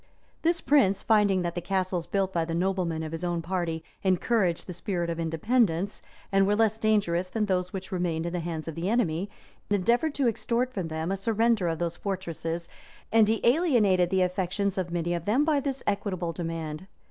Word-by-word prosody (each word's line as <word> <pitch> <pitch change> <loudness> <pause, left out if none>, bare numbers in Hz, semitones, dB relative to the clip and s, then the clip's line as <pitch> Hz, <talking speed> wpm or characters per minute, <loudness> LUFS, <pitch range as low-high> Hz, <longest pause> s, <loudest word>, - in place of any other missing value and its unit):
This 335 +1 +1
prince, 255 -9 +3
finding 205 -4 +3
that 170 -1 -2
the 175 - -3
castles 185 -2 -1
built 195 -1 0
by 170 -2 +1
the 165 0 -3
noblemen 175 -3 0
of 155 - -5
his 165 +1 -5
own 175 -1 -1
party 170 -2 -2 0.2
encouraged 190 -1 +1
the 180 - -6
spirit 175 -2 -2
of 165 - -4
independence, 175 +3 +1 0.3
and 195 0 +4
were 205 - +3
little 220 +2 +4
less 220 +1 -3
dangerous 190 -5 +1
than 215 +2 0
those 180 -2 0
which 190 -1 -6
remained 170 -3 -1
in 170 - -3
the 180 - -1
hands 165 -2 -4
of 165 - -4
the 170 +5 -2
enemy, 200 -5 0 0.4
endeavored 235 - +2
to 275 -3 +2
extort 240 +2 0
from 185 -7 -3
them 160 +2 -3
a 195 - 0
surrender 225 -1 +2
of 165 -1 -1
those 170 0 -2
fortresses 170 -3 -4 0.4
and 225 -1 +5
he 220 +1 +1
alienated 235 - +3
the 190 0 +3
affections 185 +2 -1
of 185 -2 -2
many 175 0 -1
of 170 -1 -3
them 250 +8 +3
by 305 -3 +3
this 275 -1 -3
equitable 190 -4 -1
demand. 165 0 -5
185 Hz, 200 wpm, -27 LUFS, 170-215 Hz, 0.4 s, and